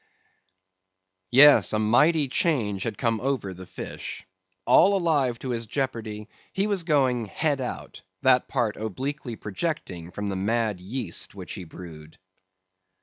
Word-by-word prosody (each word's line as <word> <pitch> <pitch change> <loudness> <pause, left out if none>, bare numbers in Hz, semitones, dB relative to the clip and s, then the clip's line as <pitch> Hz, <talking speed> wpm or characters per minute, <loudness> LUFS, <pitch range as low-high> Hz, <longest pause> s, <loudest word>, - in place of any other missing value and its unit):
Yes, 135 -4 +7
a - - +2
mighty 140 +8 +3
change 120 - 0
had 110 -1 -3
come 115 -2 0
over 125 -8 -2
the 95 0 -11
fish. - - -7 0.4
All 200 +1 +5
alive 145 -9 +1
to 130 - -6
his 115 -1 -3
jeopardy, 110 -4 -3 0.3
he 195 - 0
was 200 -3 0
going 130 -7 +2
"head 145 +5 0
out"; 125 - -6 0.2
that 130 -1 +4
part 120 -6 -1
obliquely 125 +4 -4
projecting 100 - -4
from 105 +3 -5
the 100 - -2
mad 110 0 0
yeast 105 -1 -4
which - - -8
he 90 - -7
brewed. 80 -2 -12
120 Hz, 140 wpm, -25 LUFS, 105-140 Hz, 0.4 s, Yes